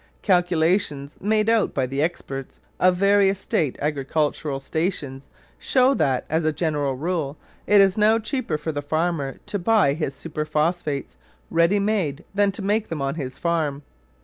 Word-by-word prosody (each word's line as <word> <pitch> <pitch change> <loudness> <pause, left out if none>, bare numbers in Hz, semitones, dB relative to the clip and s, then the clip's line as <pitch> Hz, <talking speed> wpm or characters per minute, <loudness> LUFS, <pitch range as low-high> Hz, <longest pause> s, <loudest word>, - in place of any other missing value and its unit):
Calculations 175 -5 +1
made 215 +1 +1
out 225 -2 +2
by 130 - +1
the 135 +2 -2
experts 135 -5 -4 0.2
of 185 0 +4
various 200 +1 +3
state 155 -7 -1
agricultural 145 0 -1
stations 140 -3 -3 0.3
show 260 +1 +3
that, 135 - 0
as 160 +2 0
a 155 - +2
general 150 -3 -1
rule, 155 -1 -2 0.3
it 205 -1 +6
is 195 +1 +3
now 215 +2 +5
cheaper 225 - -2
for 150 +1 -4
the 145 -1 -3
farmer 155 -2 -1
to 205 - -3
buy 190 -6 +3
his 145 -3 -3
superphosphates 155 -1 -2 0.3
ready 170 +4 +3
made 195 -8 -1
than 200 0 +3
to 200 +1 -7
make 210 +2 0
them 160 - -4
on 135 0 -1
his 135 -4 -6
farm. 155 -4 -1
160 Hz, 155 wpm, -23 LUFS, 145-195 Hz, 0.3 s, it